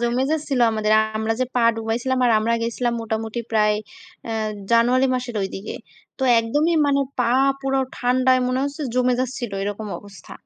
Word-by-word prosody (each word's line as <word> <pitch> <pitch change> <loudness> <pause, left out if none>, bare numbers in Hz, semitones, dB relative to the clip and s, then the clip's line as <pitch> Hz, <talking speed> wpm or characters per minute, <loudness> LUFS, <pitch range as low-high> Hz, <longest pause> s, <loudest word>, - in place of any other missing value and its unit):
জমে 240 +2 0
যাচ্ছিল 290 -5 -1
আমাদের। 215 -1 0 0.2
আমরা 220 +1 0
যে 255 - +3
পা 245 - +2
ডুবাইছিলাম 230 +4 -1
আর 240 - +3
আমরা 230 +2 +1
গিয়েছিলাম 235 +1 -1
মোটামুটি 225 +1 -3
প্রায়, 210 -1 +3 0.5
অ্যা 230 - -5 0.4
জানুয়ারি 245 +3 +4
মাসের 245 -2 -4
ওই 190 - -2
দিকে। 195 +2 -6 0.4
তো - - -4 0.2
একদমই 295 +9 +1
মানে 280 -1 +2 0.2
পা 240 -1 +2 0.3
পুরো 270 0 0 0.2
ঠান্ডায় 255 +1 +2
মনে 255 +1 0
হচ্ছে 285 +2 -4
জমে 250 0 +2
যাচ্ছিল, 245 -4 -4
এরকম 205 +2 -4
অবস্থা। 200 -6 -14
240 Hz, 165 wpm, -22 LUFS, 220-255 Hz, 0.5 s, জানুয়ারি